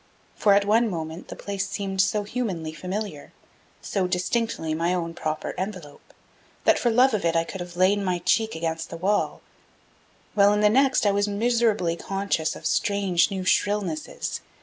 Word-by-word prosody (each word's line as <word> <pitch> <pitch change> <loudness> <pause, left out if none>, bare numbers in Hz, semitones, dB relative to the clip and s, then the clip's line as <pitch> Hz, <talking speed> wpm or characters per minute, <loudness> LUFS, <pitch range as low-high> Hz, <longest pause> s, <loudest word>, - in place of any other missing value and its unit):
For 205 -3 +4
at 200 0 +3
one 225 +3 +3
moment 160 -2 -5
the - - -8
place 200 -1 -4
seemed 195 -2 -1
so 205 +2 +1
humanly 200 -8 -3
familiar, 185 -3 -5 0.5
so 190 -2 -1
distinctly 180 -2 -1
my 170 +3 0
own 170 -2 -3
proper 155 -2 -3
envelope, 185 -7 -7 0.5
that - - +4
for 240 - +2
love 250 +2 +4
of 210 - 0
it 170 0 +1
I 165 - +3
could 185 +2 -7
have 175 0 -8
laid 190 +3 +4
my 185 -3 0
cheek 220 +5 +1
against 160 0 -3
the 165 - -6
wall; 195 +5 0 0.9
while 205 0 +5
in 210 - +1
the 210 - +5
next 265 +1 +3
I 205 - +4
was 200 +1 +1
miserably 215 -4 +1
conscious 195 -4 -1
of - - -11
strange 200 -5 +2
new 190 -2 -4
shrillnesses. 190 -5 -1
195 Hz, 170 wpm, -25 LUFS, 170-210 Hz, 0.9 s, while